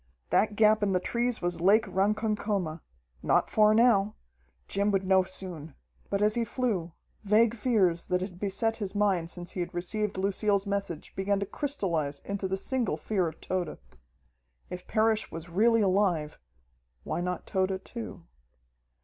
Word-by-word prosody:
That 210 0 +2
gap 215 0 +4
in 200 -2 +1
the 180 - +3
trees 235 +2 -1
was 175 -1 -2
Lake 210 +5 +5
Ronkokoma. 200 -3 -1 0.4
Not - - +2
far 215 0 +5
now! 215 -3 +4 0.5
Jim 200 +1 0
would 195 -1 +1
know 190 0 +5
soon. 180 -5 -7 0.3
But 200 +1 0
as 210 0 +3
he 235 - 0
flew, 210 -8 -2 0.3
vague 215 +2 +4
fears 205 -8 +1
that 180 0 0
had 185 -1 -6
beset 215 +3 -1
his 200 -2 -5
mind 195 -5 +1
since 175 0 -6
he - - -6
had 175 +1 -4
received 195 +3 -2
Lucille's 200 +1 +1
message 200 -5 -4
began 195 +1 0
to 200 - -1
crystallize 170 - -2
into 200 -1 -3
the 190 +1 -1
single 235 - -1
fear 185 +2 0
of 160 - -7
Tode. 180 -4 -3 0.9
If 180 0 -7
Parrish 220 0 +1
was 165 +1 -7
really 230 +5 +4
alive 185 -6 +1 0.6
why - - -3
not 180 0 -3
Tode 190 0 0
too? 235 -2 -7
195 Hz, 160 wpm, -28 LUFS, 180-215 Hz, 0.9 s, Lake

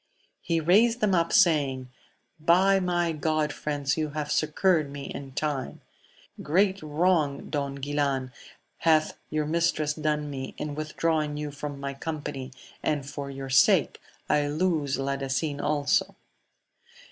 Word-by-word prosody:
He 170 -1 0
raised 215 +9 +4
them 210 -4 +2
up, 170 -2 +2
saying, 140 -9 +3 0.6
I 190 +3 +5
my 175 -2 0
God, 155 -1 0
friends, 145 -1 -2
you 155 -1 -1
have 150 0 -2
succoured 155 +1 +2
me 140 0 -7
in 135 -1 -7
trm( 145 -1 -2 0.6
great 190 +5 +2
wrong, 155 -2 0
Don 140 -2 -2
Guilan, 140 -2 -1 0.5
hath 155 -1 +3
your 155 -1 -1
mistress 155 -1 +1
done 150 -1 -2
n 130 -1 -6
in 150 -1 -4
withdrawing 155 0 -1
you 150 -1 -4
from 145 0 -6
my 140 0 -4
company, 140 -3 -5 0.3
and 145 -3 -1
for 140 0 -6
yoi 135 -1 -6
sake 130 0 +4 0.3
I 150 -1 +2
lose 150 -2 0
Ladasin 140 +2 -2
also. 145 -1 +1
150 Hz, 135 wpm, -27 LUFS, 140-165 Hz, 0.6 s, I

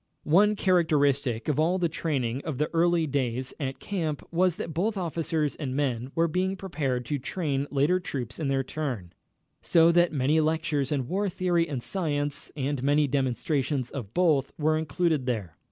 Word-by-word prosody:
One 205 +7 +4
characteristic 145 - +2
of 150 -1 +1
all 170 +4 +3
the 175 -2 +1
training 140 -6 -2
of 155 -5 -4
the 150 +2 -1
early 170 0 +3
days 130 -3 -2
at 135 -2 -3
camp 160 -7 -3
was 180 0 +2
that 165 - -5
both 205 +6 0
officers 160 -4 -1
and 135 -4 -4
men 130 -3 -1
were 165 0 +3
being 185 +4 0
prepared 140 -10 -2
to 145 -2 -2
train 140 -1 -2
later 145 +6 +2
troops 125 -8 -5
in 155 - -1
their 135 -1 +1
turn, 125 - -4 0.5
so 165 0 +5
that 175 0 +4
many 145 +2 +2
lectures 155 -3 0
in 135 -4 -1
war 195 +5 0
theory 175 -2 +1
and 130 -5 -3
science, 145 -6 -2
and 140 -1 -1
many 145 +2 +3
demonstrations 135 0 -1
of 115 -7 -6
both, 155 -7 +3
were 155 0 +2
included 155 -2 0
there. 105 -10 -2
150 Hz, 170 wpm, -27 LUFS, 135-170 Hz, 0.5 s, so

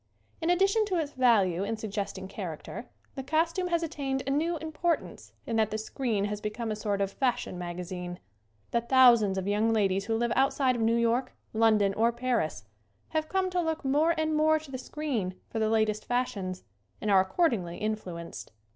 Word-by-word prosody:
In 325 - 0
addition 390 +5 +3
to 380 -3 -1
its 305 -3 -1
value 205 -9 +3
in 220 +2 -2
suggesting 200 -3 -4
char 180 -6 -5
acter - - -8 0.3
the 270 - -5
costume 330 +6 0
has 340 -1 0
attained 275 -5 -2
a 275 - -1
new 325 +4 +1
impor 320 +2 0
tance - - -13
in 230 - -1
that 220 -1 +3
the 215 - -2
screen 220 -2 -1
has 210 0 -4
become 220 +2 -3
a - - -1
sort 205 -2 -1
of 195 0 0
fashion 250 -7 -1
magazine. 180 0 -5 0.5
The 235 - +2
thousands 235 -5 +5
of 190 0 -2
young 210 +2 +2
ladies 195 -3 +1
who 225 - 0
live 235 0 0
outside 270 -1 +2
of 235 - -2
New 225 +1 +3
York, 235 +2 +1 0.2
London 215 -3 +3
or 230 +3 +2
Paris 235 - -1 0.4
have 310 -1 -1
come 380 -1 0
to 360 -1 +1
look 320 -3 -2
more 305 +5 +3
and 315 0 +1
more 310 +1 +4
to 305 -3 -10
the 260 - -4
screen 255 -11 -3 0.2
for 225 - -2
the 220 0 +2
latest 215 -1 +1
fashions, 235 -7 -2 0.4
and 210 - -1
are 190 -1 +7
ac 190 - -6
cordingly 210 - +1
influenced. 185 - -5
230 Hz, 195 wpm, -29 LUFS, 200-295 Hz, 0.5 s, are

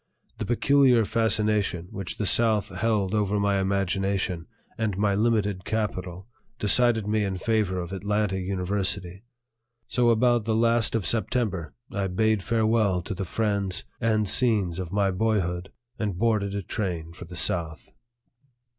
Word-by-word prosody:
The - - -3
peculiar 125 -1 +4
fascination 105 -5 +1
which 95 -3 -5
the 105 - -2
South 110 0 +3
held 105 -1 0
over 105 -1 +1
my 100 -1 +1
imagination 95 -2 -1 0.3
and 110 -4 -2
my 100 0 +2
limited 105 -3 0
capital 95 -4 -3 0.3
decided 115 0 +3
me 105 0 0
in 95 -2 -2
favor 105 -3 0
of 90 +1 -5
Atlanta 100 0 -1
University; 95 0 -3 0.6
so 120 +2 +2
about 120 -1 +3
the 110 -1 0
last 115 0 +2
of 110 -5 -1
September 100 - -1 0.2
I 100 -1 -1
bade 110 +2 +1
farewell 110 -4 +1
to 100 - -5
the 95 +1 -4
friends 100 -1 -1 0.2
and 110 -2 +1
scenes 100 -7 +2
of 90 -2 -5
my 100 -1 +1
boyhood 95 -3 -1 0.3
and 105 -5 -2
boarded 105 -2 0
a 100 - -3
train 85 -6 -4
for 85 - -10
the 90 +1 -10
South. 85 -2 0
100 Hz, 145 wpm, -26 LUFS, 95-110 Hz, 0.6 s, peculiar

